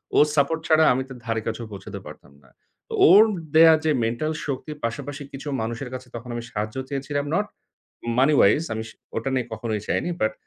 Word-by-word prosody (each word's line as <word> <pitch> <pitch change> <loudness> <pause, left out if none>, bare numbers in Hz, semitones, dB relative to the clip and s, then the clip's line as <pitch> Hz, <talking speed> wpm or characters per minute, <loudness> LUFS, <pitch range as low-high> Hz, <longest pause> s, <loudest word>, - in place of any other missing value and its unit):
ওর 150 - +7
support 155 +3 +2
ছাড়া 160 0 +5
আমি 130 - -1
তার 130 - -10
ধারের 115 -2 -1
কাছেও 115 +1 -3
পৌঁছাতে 100 - -8
পারতাম - - -12
না। 65 - -22 0.6
ওর 205 +4 +9 0.3
দেয়া 160 0 +9
যে 155 - +3
মেন্টাল 120 +7 -1
শক্তির 145 +2 -4
পাশাপাশি 145 +4 -5
কিছু 140 +2 -8
মানুষের 115 +3 -4
কাছে 130 0 -7
তখন 120 +1 -8
আমি 120 - -4
সাহায্য 105 +2 -3
চেয়েছিলাম। 145 +1 -2
Not 205 +1 +1 0.7
money 145 +3 +5
wise 150 +11 +4
আমি 110 0 -3
স - - -10 0.3
ওটা 115 +4 -1
নিয়ে 125 -2 0
কখনোই 110 -1 -3
চাইনি। - - 0
বাট 110 0 +2
130 Hz, 190 wpm, -24 LUFS, 115-150 Hz, 0.7 s, ওর